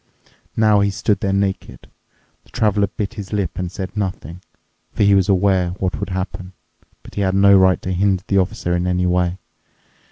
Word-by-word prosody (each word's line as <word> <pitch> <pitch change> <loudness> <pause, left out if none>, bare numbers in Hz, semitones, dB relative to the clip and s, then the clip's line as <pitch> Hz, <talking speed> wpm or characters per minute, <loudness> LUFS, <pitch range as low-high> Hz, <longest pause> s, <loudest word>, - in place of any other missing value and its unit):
Now 110 -2 +4
he 100 0 +2
stood 100 0 -1
there 100 - -1
naked. 100 0 -3 0.6
The - - -23
Traveler 105 -2 +1
bit 100 0 -5
his 100 -2 -8
lip 100 -5 -1
and 90 -1 -3
said 95 +1 -6
nothing. 90 -4 -4 0.5
For - - +1
he 100 0 +5
was 95 0 +3
aware 95 -2 +2
what 95 -2 -2
would - - -4
happen, 95 0 -5 0.5
but - - -14
he 100 - -3
had 95 -1 +1
no 100 0 +6
right 95 -1 +4
to 95 - -3
hinder 95 0 +1
the 100 - +2
Officer 90 -2 -1
in 90 +1 -1
any 90 0 0
way. 90 0 0
95 Hz, 190 wpm, -19 LUFS, 90-100 Hz, 0.6 s, no